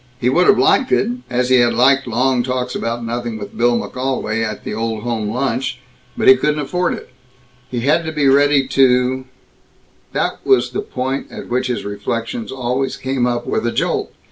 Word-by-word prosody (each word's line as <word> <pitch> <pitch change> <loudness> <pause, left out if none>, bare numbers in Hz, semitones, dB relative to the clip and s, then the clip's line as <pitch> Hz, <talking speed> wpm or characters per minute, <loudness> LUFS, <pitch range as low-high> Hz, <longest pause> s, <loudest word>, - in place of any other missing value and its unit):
He 125 - +1
would 180 +7 +3
have 205 - +6
liked 260 - +3
it, 225 - +2 0.2
as 125 0 0
he 130 - +5
had 120 -1 +3
liked 135 +2 +4
long 125 +2 +1
talks 125 0 -2
about 115 0 -3
nothing 120 -1 -3
with 105 - -8
Bill 120 0 +2
McGolwey 125 -4 -2
at 110 -2 -4
the - - -5
Old 110 0 -3
Home 115 -3 -2
Lunch. 125 +2 -1 0.4
But - - 0
he 130 - +10
couldn't 150 +3 0
afford 180 +5 -1
it. - - -12 0.6
He 120 -2 -3
had 150 +6 +2
to 160 - -3
be 150 -3 +1
ready 140 0 +4
to 130 0 +3 0.9
That - - -2
was 395 - +3
the 405 - -2
point 135 - -4
at - - -9
which 130 +1 0
his 125 -4 -3
reflections 115 - -4
always 130 +1 -2
came 130 -2 -1
up 120 -1 -2
with - - -1
a - - 0
jolt. - - -1
125 Hz, 195 wpm, -18 LUFS, 120-135 Hz, 0.9 s, he